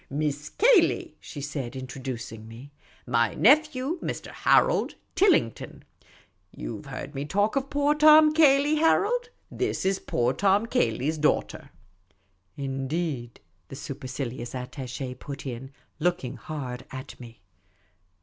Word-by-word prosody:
" -, -, -39 dB
Miss 145 Hz, +1 st, -2 dB
Cayley," 455 Hz, -5 st, +3 dB
she 145 Hz, -, -9 dB
said, 135 Hz, -3 st, -5 dB
introducing 130 Hz, -4 st, -6 dB
me; 120 Hz, +6 st, -12 dB, 0.2 s
" -, -, -29 dB
my 120 Hz, -1 st, +1 dB
nephew, 295 Hz, -, +3 dB
Mr. -, -, -5 dB
Harold -, -, +3 dB, 0.2 s
Tilling 360 Hz, -, +4 dB
ton. -, -, -11 dB, 0.7 s
You -, -, -6 dB
've -, -, -14 dB
heard 145 Hz, -, -7 dB
me 140 Hz, 0 st, -3 dB
talk 205 Hz, -, 0 dB
of 275 Hz, 0 st, -1 dB
poor 290 Hz, 0 st, +2 dB
Tom 305 Hz, 0 st, +7 dB
Cayley, 295 Hz, -1 st, +5 dB
Harold? 455 Hz, +10 st, +2 dB, 0.2 s
This 385 Hz, -, -2 dB
is 195 Hz, 0 st, +1 dB
poor 120 Hz, +1 st, 0 dB
Tom 200 Hz, -, +2 dB
Cayley's 160 Hz, -, 0 dB
daughter." 150 Hz, -, 0 dB, 0.9 s
"Indeed?" 135 Hz, -2 st, -3 dB, 0.3 s
the -, -, -9 dB
supercilious 130 Hz, -3 st, -6 dB
attache 125 Hz, 0 st, -5 dB
put 140 Hz, +2 st, -8 dB
in, 130 Hz, 0 st, -6 dB, 0.3 s
looking 155 Hz, -7 st, -1 dB
hard 130 Hz, -1 st, -6 dB
at 130 Hz, -1 st, -9 dB
me. 115 Hz, -4 st, -12 dB
145 Hz, 130 wpm, -26 LUFS, -, 0.9 s, Tom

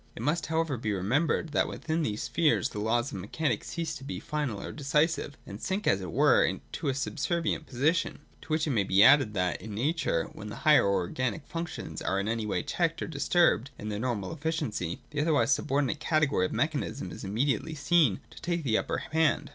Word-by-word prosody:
It 115 Hz, -, -6 dB
must 155 Hz, +4 st, 0 dB
however 160 Hz, -4 st, 0 dB
be 110 Hz, -2 st, -2 dB
remembered, 130 Hz, -, +1 dB
that 145 Hz, -, +1 dB
within 160 Hz, +1 st, -2 dB
these 105 Hz, -8 st, -2 dB
spheres 155 Hz, -4 st, +2 dB
the 105 Hz, -, -6 dB
laws 120 Hz, +5 st, 0 dB
of 95 Hz, -, -5 dB
mechanism 145 Hz, -, -1 dB
cease 165 Hz, -2 st, -4 dB
to 135 Hz, -, -12 dB
be 140 Hz, -, -5 dB
final 145 Hz, -9 st, -3 dB
or -, -, -6 dB
decisive, 150 Hz, 0 st, 0 dB
and 100 Hz, +2 st, -9 dB
sink, 195 Hz, +3 st, -2 dB
as 95 Hz, -, +3 dB
it 90 Hz, -3 st, -5 dB
were, -, -, +4 dB
to -, -, -4 dB
a 130 Hz, -, 0 dB
subservient 160 Hz, +3 st, -1 dB
position. 155 Hz, +7 st, +1 dB, 0.2 s
To -, -, -14 dB
which 155 Hz, 0 st, 0 dB
may 115 Hz, -8 st, +2 dB
be 95 Hz, +1 st, +5 dB
added, 135 Hz, -4 st, +6 dB
that, 90 Hz, -2 st, 0 dB
in 105 Hz, +1 st, -7 dB
Nature, 135 Hz, -, 0 dB
when 105 Hz, -, -8 dB
the -, -, -6 dB
higher 150 Hz, -9 st, +6 dB
or 100 Hz, -, +2 dB
organic 115 Hz, +5 st, -3 dB
functions 170 Hz, 0 st, -5 dB
are 95 Hz, -, 0 dB
in 100 Hz, -, -2 dB
any 115 Hz, -1 st, -1 dB
way -, -, -1 dB
checked 165 Hz, -1 st, 0 dB
or -, -, -4 dB
dis 145 Hz, -3 st, -4 dB
turbed 170 Hz, -7 st, +4 dB
in 105 Hz, -, -6 dB
their 105 Hz, -1 st, -3 dB
normal 120 Hz, +1 st, -2 dB
efficiency, 150 Hz, -, -3 dB
the 150 Hz, -1 st, -1 dB
otherwise 150 Hz, -2 st, +2 dB
subordinate 140 Hz, 0 st, +1 dB
category 150 Hz, -, +2 dB
of -, -, -11 dB
mechanism 140 Hz, -, -2 dB
is -, -, -8 dB
immediately 120 Hz, +8 st, -1 dB
seen 150 Hz, -, +3 dB
to -, -, -13 dB
take 170 Hz, -1 st, -1 dB
the 115 Hz, -5 st, +2 dB
upper -, -, -2 dB
hand. 155 Hz, -2 st, +2 dB
140 Hz, 210 wpm, -29 LUFS, 105-160 Hz, 0.2 s, added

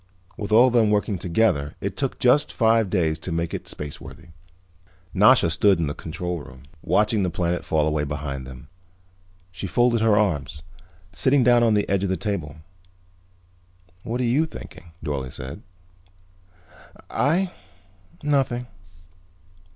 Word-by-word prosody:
With 105 Hz, -2 st, -6 dB
all 115 Hz, +4 st, +7 dB
of -, -, -6 dB
them 115 Hz, -3 st, +4 dB
working 105 Hz, -2 st, 0 dB
together 85 Hz, -5 st, 0 dB
it 100 Hz, -1 st, -4 dB
took 135 Hz, -2 st, -2 dB
just 145 Hz, +4 st, +3 dB
five 115 Hz, -2 st, +3 dB
more -, -, -9 dB
days 80 Hz, -5 st, 0 dB
to 90 Hz, -, -5 dB
make 85 Hz, 0 st, -2 dB
it -, -, -5 dB
spaceworthy. 75 Hz, +3 st, -7 dB, 0.8 s
Nasha 105 Hz, 0 st, +5 dB
stood 100 Hz, +4 st, +4 dB
in 85 Hz, -, 0 dB
the 75 Hz, -, -3 dB
control 90 Hz, +1 st, -5 dB
room, 65 Hz, -3 st, -13 dB, 0.2 s
watching 105 Hz, 0 st, +2 dB
the 90 Hz, -, 0 dB
planet 85 Hz, +1 st, -2 dB
fall 75 Hz, -2 st, +1 dB
away 75 Hz, -1 st, 0 dB
behind 70 Hz, -2 st, -5 dB
them. 65 Hz, +3 st, -11 dB, 0.8 s
She 90 Hz, +2 st, -6 dB
folded 120 Hz, +4 st, +2 dB
her 110 Hz, -2 st, +4 dB
arms, 75 Hz, -7 st, -1 dB, 0.5 s
sitting 130 Hz, +7 st, +2 dB
down 120 Hz, 0 st, +5 dB
on 115 Hz, -2 st, +3 dB
the 105 Hz, -, +1 dB
edge 100 Hz, 0 st, +1 dB
of 100 Hz, -, -1 dB
the 95 Hz, -, 0 dB
table. 85 Hz, -9 st, -4 dB, 1.5 s
"What 115 Hz, +6 st, -4 dB
are -, -, +1 dB
you 135 Hz, +7 st, +2 dB
thinking?" 150 Hz, -, -11 dB, 0.2 s
Dorle 70 Hz, -4 st, -3 dB
said. 65 Hz, +3 st, -8 dB, 1.5 s
"I? 165 Hz, +10 st, +1 dB, 0.7 s
Nothing." 135 Hz, -4 st, 0 dB
95 Hz, 150 wpm, -23 LUFS, 80-115 Hz, 1.5 s, all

